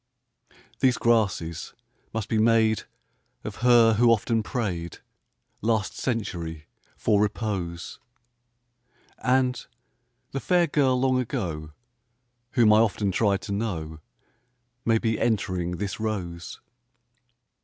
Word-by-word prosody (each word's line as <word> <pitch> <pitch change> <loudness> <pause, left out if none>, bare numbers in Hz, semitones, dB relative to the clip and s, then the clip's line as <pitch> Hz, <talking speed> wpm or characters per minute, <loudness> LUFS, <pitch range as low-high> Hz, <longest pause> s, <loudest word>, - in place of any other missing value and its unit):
These 130 -2 +3
grasses 100 -8 0 0.4
must 110 -2 -3
be 110 - 0
made 110 -1 +3 0.6
Of - - -6
her 120 -2 +5
who 120 +2 +4
often 115 0 +2
prayed, 95 - -3 0.6
Last 110 -3 0
century, 85 - -3 0.3
for 105 -2 +2
repose; 100 -5 -3 1.2
And 125 0 +1 0.7
the 135 - -2
fair 175 +3 +3
girl 135 -5 +2
long 130 0 +2
ago 85 - -4 0.8
Whom 115 -3 +5
I 105 - +6
often 105 -3 +1
tried 100 -1 +1
to 90 - -6
know 85 -7 -3 0.9
May 115 -1 +4
be 110 -1 -1
entering 90 -6 0
this 100 +1 -4
rose. 90 -6 -4
110 Hz, 105 wpm, -26 LUFS, 90-115 Hz, 1.2 s, I